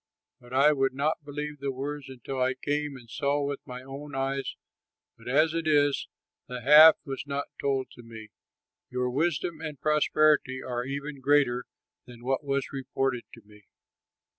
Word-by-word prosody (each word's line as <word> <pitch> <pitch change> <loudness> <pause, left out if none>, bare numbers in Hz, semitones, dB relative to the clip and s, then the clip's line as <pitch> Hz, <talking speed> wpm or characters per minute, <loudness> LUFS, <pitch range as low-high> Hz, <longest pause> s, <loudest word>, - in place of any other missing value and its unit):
But 120 0 -17
I 140 +4 +5
would 135 -2 0
not 150 +3 0
believe 150 0 -5
the 140 0 -2
words 140 +1 -5
until 130 +1 -5
I 130 +1 +2
came 145 +1 -2
and 120 -2 -15
saw 140 +3 0
with 140 0 -3
my 125 0 -7
own 140 +2 -8
eyes; 135 0 -2 0.6
but 115 - -16
as 155 +5 +3
it 165 -1 -2
is, 145 -2 +3 0.4
the 125 -1 -6
half 150 +5 +9
was 135 -1 -5
not 140 0 -3
told 135 -2 0
me; 115 -2 -11 0.6
your 125 0 -1
wisdom 160 +3 -1
and 150 -4 -6
prosperity 150 -3 +3
are 125 -1 -3
even 140 +1 -5
greater 135 -3 +3 0.4
than 120 -1 -13
what 135 +3 0
was 140 0 -2
reported 135 -2 -2
to 115 - -15
me." 105 -1 -19
140 Hz, 165 wpm, -28 LUFS, 130-145 Hz, 0.6 s, half